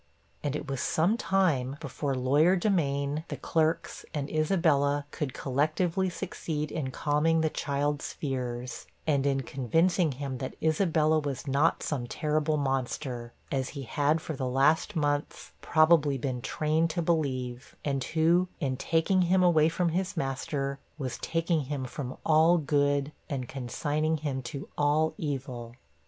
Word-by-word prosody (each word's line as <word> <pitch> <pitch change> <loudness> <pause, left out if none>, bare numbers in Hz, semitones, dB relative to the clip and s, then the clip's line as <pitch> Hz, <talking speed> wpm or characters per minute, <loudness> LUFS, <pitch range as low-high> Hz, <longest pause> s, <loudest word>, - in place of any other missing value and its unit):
And 145 -1 -1
it 150 - -4
was 135 -2 -3
some 175 +8 +2
time 170 - +1
before 140 -1 -3
lawyer 145 +8 +4
Demain, 150 -6 0
the - - -5
clerks, 160 0 0
and 145 -1 -3
Isabella, 155 -3 +2
could 150 -5 -3
collectively 155 +7 0
succeed 150 -3 -4
in 140 -5 -2
calming 155 +4 +1
the 160 -1 +1
child's 145 0 -1
fears, 125 -3 -4 0.2
and 140 -3 +2
in 135 -1 +1
convincing 160 - +1
him 135 -1 -5
that 130 - -5
Isabella 160 -1 +2
was 140 -4 -4
not 140 +4 +2
some 130 -5 -2
terrible 155 +2 0
monster, 130 -3 -2 0.2
as 130 -2 -1
he 140 - -4
had 145 +5 +1
for 160 - -5
the 130 -1 -2
last 150 +9 +2
months, 145 -2 -1
probably, 155 -3 +4
been 130 -1 -3
trained 155 +4 +1
to 170 +1 -1
believe; 130 -6 -1
and 135 -3 0
who, 170 +3 +3
in 130 -4 -1
taking 165 +6 +2
him 180 +1 +3
away 160 -3 +5
from 170 +1 0
his 185 +2 -2
master, 135 0 -2 0.2
was 130 -5 -4
taking 165 -2 0
him 135 -1 -3
from 130 0 -6
all 160 +2 +5
good, 145 -1 +1 0.2
and 130 -4 -3
consigning 150 +5 -1
him 145 -3 -3
to 135 +3 -6
all 150 +2 +3
evil. 130 -5 -4
145 Hz, 145 wpm, -29 LUFS, 135-160 Hz, 0.2 s, away